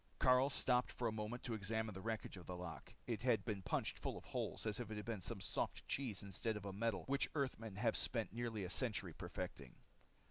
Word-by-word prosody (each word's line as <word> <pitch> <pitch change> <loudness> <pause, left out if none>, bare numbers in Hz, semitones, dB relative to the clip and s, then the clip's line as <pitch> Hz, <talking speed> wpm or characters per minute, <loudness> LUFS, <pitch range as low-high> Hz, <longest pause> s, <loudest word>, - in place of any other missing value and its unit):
Karyl 130 0 +7
stopped 125 -2 +4
for 120 - 0
a - - +2
moment 110 +3 -3
to 120 - -1
examine 110 +1 0
the 95 - -6
wreckage 110 0 -2
of 90 -3 -9
the 90 - -3
lock. 90 -2 -6
It 115 -4 -1
had 120 -5 +3
been 100 -3 -1
punched - - 0
full - - -2
of - - -8
holes - - -1
as 105 0 0
if 120 - -3
it 110 - -3
had 105 - -4
been 115 -4 -2
some 105 +4 -3
soft - - -1
cheese 120 -9 0
instead 105 +3 -1
of 105 - -7
a 100 - -3
metal 110 +1 +1
which 140 +1 +2
Earthmen 115 -7 -1
had 105 - +3
spent - - +1
nearly 115 -3 -1
a 90 - -2
century 105 - +1
perfecting. - - -5
110 Hz, 225 wpm, -42 LUFS, 100-120 Hz, -, Karyl